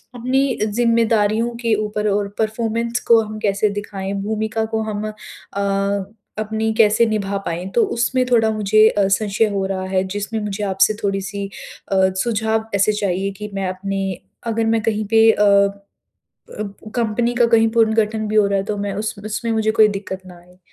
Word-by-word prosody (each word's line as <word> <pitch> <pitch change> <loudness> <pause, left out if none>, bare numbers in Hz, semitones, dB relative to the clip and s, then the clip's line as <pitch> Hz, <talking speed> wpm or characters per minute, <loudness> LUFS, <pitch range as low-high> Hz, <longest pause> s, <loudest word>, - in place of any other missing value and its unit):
अपनी 255 +3 +1 0.2
ज़िम्मेदारियों 230 0 +2
के 230 -2 +1
ऊपर 210 0 -2
और 200 0 0
परफॉर्मेंस 230 +2 -1
को 230 -1 +7
हम 215 0 -6
कैसे 205 0 +1
दिखाएँ? 200 -1 -5
भूमिका 220 +2 -2
को 220 - +1
हम 215 0 -3
अ 200 -1 -3 0.3
अपनी 220 +1 -1
कैसे 220 +1 +5
निभा 200 -2 -1
पाएँ? 170 +2 -3
तो 235 - +5
उसमें 255 +2 +1
थोड़ा 225 -2 +4
मुझे 215 +1 +4
अ, 200 -2 +1
संशय 205 +2 +1
हो 195 -1 -1
रहा 190 -1 -3
है 185 0 +2
जिसमें 210 +2 -3
मुझे 210 0 -4
आपसे 195 +2 +3
थोड़ी-सी 200 0 -2 0.5
अ, - - +2 0.3
सुझाव 220 -1 -1
ऐसे 210 +2 +3
चाहिए 195 -1 -1
कि 210 0 -6
मैं 195 -1 -1
अपनी 195 0 -3 0.3
अगर 225 0 0
मैं 225 0 +2
कहीं 215 -2 0
पे 225 0 +6
अ, 210 - -2
अ, 200 0 +2 1.0
कंपनी 235 +1 0
का 240 -1 +4
कहीं 225 -1 +4
पुनर्गठन 220 -1 +2
भी 215 - -1
हो 205 -1 +5
रहा 200 0 +1
है 195 - -2
तो 210 -1 -3
मैं 200 -1 -3
उस 215 +2 -3
उसमें 225 +2 -2
मुझे 220 -1 +1
कोई 215 -1 +5
दिक़्क़त 195 -2 -5
ना 180 -1 -12
आए। 180 +1 -21
215 Hz, 175 wpm, -20 LUFS, 200-225 Hz, 1.0 s, को